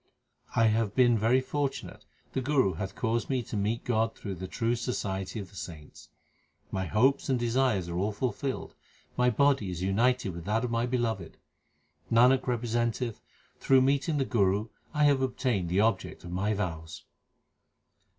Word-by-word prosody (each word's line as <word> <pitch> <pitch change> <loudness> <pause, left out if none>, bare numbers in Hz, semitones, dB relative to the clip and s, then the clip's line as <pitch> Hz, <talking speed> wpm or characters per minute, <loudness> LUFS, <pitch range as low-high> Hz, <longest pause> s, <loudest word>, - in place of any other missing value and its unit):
I 115 - +4
have 110 -2 +1
been 120 -2 +5
very 115 +4 +3
fortunate; 140 +1 -4 0.3
the 130 - -1
Guru 130 -8 +2
hath 95 -1 -5
caused 115 0 -1
me 130 -3 0
to 110 - -7
meet 105 +3 -1
God 115 -2 0
through 100 - -6
the 95 +1 -6
true 115 +4 -1
society 100 -5 -3
of 100 -1 -8
the - - -17
saints. 80 -2 -9 0.6
My 95 -1 -2
hopes 130 +10 +2
and 130 - +3
desires 120 -5 +1
are 85 - -4
all 100 +4 0
fulfilled; 130 +5 -3 0.4
my 125 0 +3
body 135 -4 +2
is 90 0 -4
united 115 +2 +1
with 85 0 -8
that 110 +4 0
of 120 - -4
the 115 +1 0
Beloved. 115 -9 -2 0.7
Nanak 125 +3 +5
representeth 120 -1 -1 0.4
through 135 -1 +4
meeting 140 +4 +1
the 135 - +1
Guru 105 -1 +1 0.2
I 150 -1 +1
have 140 -2 +4
obtained 125 -8 -1
the 95 +4 +2
object 110 -4 0
of 85 - -8
my 100 +4 0
vows. 80 -5 -5
115 Hz, 165 wpm, -29 LUFS, 95-125 Hz, 0.7 s, been